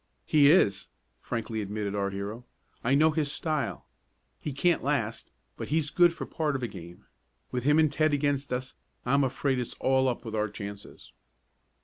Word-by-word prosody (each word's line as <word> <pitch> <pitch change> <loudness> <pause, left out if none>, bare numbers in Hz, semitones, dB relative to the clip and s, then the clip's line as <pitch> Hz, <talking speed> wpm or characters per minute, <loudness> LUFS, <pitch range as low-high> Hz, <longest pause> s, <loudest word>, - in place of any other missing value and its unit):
"He 145 -2 +5
is," 105 - +4 0.3
frankly 115 -1 -3
admitted 105 0 -3
our 100 -1 0
hero. 100 +4 -5 0.4
"I 130 +4 +3
know 155 +2 +5
his 150 -2 -1
style. 150 -6 -2 0.5
He 150 - -4
can't 170 +6 +1
last, - - -1 0.3
but - - -5
he's 150 0 0
good 175 -1 +5
for 170 - -6
part 150 -3 -1
of 130 - -3
a - - 0
game. 85 -4 -11 0.5
With 125 0 -3
him 150 +1 +5
and 155 -2 +4
Ted 155 +1 +2
against 145 -1 0
us 125 +1 -3 0.3
I'm 140 +3 +3
afraid 135 0 0
it's 120 - -4
all 130 0 +2
up 120 0 -4
with 110 - -6
our 110 -1 0
chances." 100 -1 -9
130 Hz, 175 wpm, -28 LUFS, 110-150 Hz, 0.5 s, He